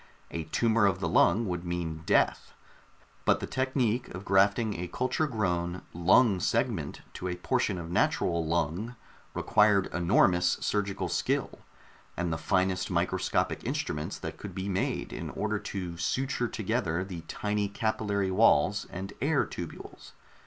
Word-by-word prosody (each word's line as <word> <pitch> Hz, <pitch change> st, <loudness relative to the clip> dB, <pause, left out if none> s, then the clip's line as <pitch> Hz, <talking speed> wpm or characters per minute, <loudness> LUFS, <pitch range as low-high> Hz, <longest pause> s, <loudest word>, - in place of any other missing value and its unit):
A 80 Hz, -1 st, -4 dB
tumor 110 Hz, +5 st, +3 dB
of 95 Hz, -1 st, 0 dB
the 90 Hz, -, -1 dB
lung 100 Hz, +6 st, +3 dB
would 90 Hz, -2 st, -3 dB
mean 85 Hz, -3 st, -3 dB
death... -, -, +2 dB, 0.7 s
but -, -, +3 dB
the -, -, -3 dB
technique 130 Hz, -2 st, 0 dB
of 95 Hz, +2 st, -8 dB
grafting 100 Hz, +3 st, +3 dB
a 90 Hz, -, -3 dB
culture 130 Hz, -, 0 dB
grown 90 Hz, -7 st, -1 dB
lung 95 Hz, +4 st, +4 dB
segment -, -, -1 dB
to 90 Hz, -, -5 dB
a 90 Hz, -, -2 dB
portion 115 Hz, -1 st, 0 dB
of 85 Hz, -1 st, -6 dB
natural 85 Hz, -1 st, +1 dB
lung 85 Hz, +8 st, -1 dB, 0.4 s
required 105 Hz, -2 st, +3 dB
enormous 90 Hz, 0 st, +3 dB
surgical 100 Hz, -2 st, -1 dB
skill, -, -, -1 dB, 0.6 s
and 85 Hz, -1 st, -1 dB
the 80 Hz, -, -3 dB
finest 95 Hz, +2 st, +1 dB
microscopic -, -, 0 dB
instruments 75 Hz, +1 st, -3 dB
that -, -, -6 dB
could -, -, -8 dB
be 95 Hz, +1 st, -3 dB
made 95 Hz, -1 st, -2 dB
in -, -, -5 dB
order -, -, -2 dB
to 90 Hz, -3 st, -5 dB
suture 125 Hz, +8 st, -1 dB
together 100 Hz, -6 st, -1 dB
the 90 Hz, -3 st, -7 dB
tiny 105 Hz, 0 st, -1 dB
capillary 100 Hz, -2 st, -1 dB
walls 100 Hz, 0 st, +3 dB
and 95 Hz, +2 st, -6 dB
air -, -, +2 dB
tubules. -, -, -9 dB
95 Hz, 145 wpm, -29 LUFS, 85-105 Hz, 0.7 s, lung